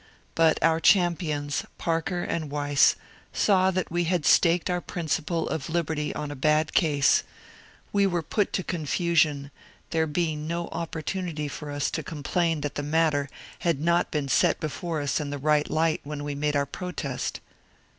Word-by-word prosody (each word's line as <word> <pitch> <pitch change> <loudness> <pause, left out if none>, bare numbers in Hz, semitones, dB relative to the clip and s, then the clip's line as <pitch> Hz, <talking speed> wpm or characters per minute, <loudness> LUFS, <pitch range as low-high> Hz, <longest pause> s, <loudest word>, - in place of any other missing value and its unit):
But 165 -1 +4
our 165 0 +4
champions, 160 -6 +2
Parker 170 +2 -1
and 160 -3 -3
Weiss, 145 -1 +3 0.4
saw 190 -2 +3
that 185 -3 -2
we 175 0 0
had 170 -2 0
staked 170 0 +4
our 180 -1 0
principle 165 -1 -2
of 155 0 -3
liberty 160 -3 -1
on 150 -1 -4
a - - -5
bad 155 +3 +2
case; 145 -5 +3 0.7
we 200 -1 +4
were 175 -3 -1
put 205 +5 0
to 185 - 0
confusion, 155 -3 0 0.4
there 160 -1 +1
being 155 -1 -2
no 170 +1 -3
opportu 165 +3 -4
nity 150 -2 -4
for 150 - -7
us 145 0 -1
to - - -2
complain 165 0 -1
that 145 -1 -3
the 145 - -3
matter 150 -1 +1 0.3
had 170 -5 0
not 170 +3 +2
been 150 -2 -2
set - - +3
before 160 +1 -3
us 145 +2 0
in 150 -2 -3
the 145 - -3
right 150 +1 +2
light 160 0 +1
when 145 0 -6
we 145 0 -3
made 145 +1 -1
our 140 0 +2
protest. 145 -5 -4
160 Hz, 170 wpm, -26 LUFS, 145-170 Hz, 0.7 s, But